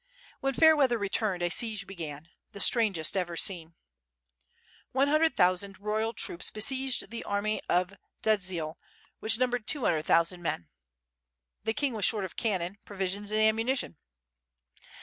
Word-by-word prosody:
When 270 -1 -1
fair 315 -1 +7
weather 260 -5 +3
returned 200 -3 -1
a 175 - +1
siege 215 -1 0
began: 160 -5 -8 0.2
the 200 - -9
strangest 200 -8 +3
ever 175 -3 -1
seen. 170 -3 0 1.2
One 270 +2 +3
hundred 310 +2 +3
thousand 185 +2 +1
royal 215 +2 -1
troops 175 -5 -2
besieged 260 +1 0
the 235 - -5
army 205 +1 -1
of 180 +2 +1 0.3
Dziedzial 180 -7 0 0.4
which 225 +1 +1
numbered 245 -2 -1
two 290 -5 0
hundred 155 -2 +1
thousand 170 +2 +3
men. 85 - -3 1.0
The 220 0 -1
king 285 -4 0
was 210 -4 +1
short 210 -3 +2
of 185 - -9
cannon, 195 -3 -1
provisions 200 +1 -4
and 215 0 +2
ammunition. 225 - +1
205 Hz, 145 wpm, -29 LUFS, 180-230 Hz, 1.2 s, fair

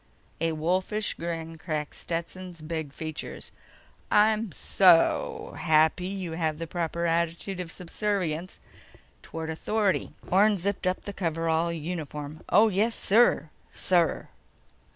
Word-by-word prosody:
A 165 0 +1
wolfish 185 +6 0
grin 165 -1 -5
cracked 155 -3 -3
Stetson's 170 0 -5
big 160 -2 -4
features. 155 +1 -7 0.6
"I'm 215 +1 +3
soooooo 175 +1 +3
happy 160 +2 +3
you 190 -3 -4
have 160 -2 -1
the 165 - -4
proper 170 0 -2
attitude 170 +3 -1
of 175 -2 -5
subservience 180 -2 -2 0.6
toward 160 0 -5
authority." 205 +4 0
Orne 205 +3 +4
zipped 190 +1 0
up 185 - -1
the 200 - -6
coverall 165 -2 0
uniform. 155 -2 -5
"Oh, 220 +2 +6
yes, 215 +3 +1
sir... 205 -7 +3 0.2
sir." 175 -3 +1
170 Hz, 115 wpm, -27 LUFS, 160-190 Hz, 0.6 s, Oh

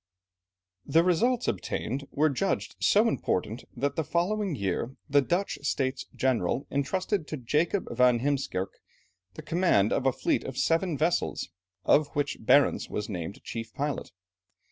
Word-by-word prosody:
The 165 +1 +3
results 230 +8 +2
obtained 135 +4 -2
were 155 +1 +2
judged 195 +9 -1
so 215 +3 +4
important, 110 - -1
that 140 +3 -1
the 160 - 0
following 185 +3 0
year, 100 +4 -2
the 145 -1 +4
Dutch 175 +8 -1
States 135 -2 -1
General 130 -1 0
entrusted 180 +5 -1
to 155 - -4
Jacob 150 - 0
van 125 -1 +4
Heemskerke, 135 -9 -2 0.6
the - - -8
command 165 - +2
of 135 - +1
a - - +5
fleet - - 0
of 130 -1 -6
seven 165 -1 +1
vessels, 165 +4 0 0.4
of 150 0 +4
which 145 -1 -1
Barentz 140 +5 +3
was 105 +1 -4
named 90 0 -5
chief 115 -1 -6
pilot. 145 0 -3
140 Hz, 145 wpm, -28 LUFS, 125-170 Hz, 0.6 s, a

